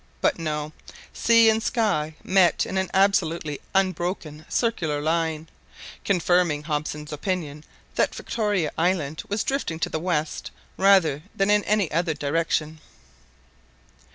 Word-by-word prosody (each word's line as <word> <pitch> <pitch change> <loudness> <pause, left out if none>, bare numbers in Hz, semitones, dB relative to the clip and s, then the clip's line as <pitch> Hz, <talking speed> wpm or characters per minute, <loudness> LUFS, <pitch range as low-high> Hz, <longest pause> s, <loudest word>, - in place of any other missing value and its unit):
But - - +1
no, 155 -1 -3 0.4
sea 230 -1 +5
and 220 0 +3
sky 200 -11 0
met 185 -2 +3
in - - -5
an 190 - -2
absolutely 170 -6 +1
unbroken 175 -5 -1
circular 170 -11 0
line, 160 0 -1 0.6
confirming 175 -5 +2
Hobson's 150 0 -4
opinion 150 -2 -3 0.3
that - - +1
Victoria 205 -8 -1
Island 160 -4 0
was 205 +1 0
drifting 270 - -2
to - - 0
the 160 - -2
west 160 -3 -2 0.3
rather 185 -7 +4
than 195 +1 +2
in 210 0 +4
any 205 -5 +1
other 165 0 0
direction. 155 +1 -1
165 Hz, 125 wpm, -24 LUFS, 155-195 Hz, 0.6 s, sea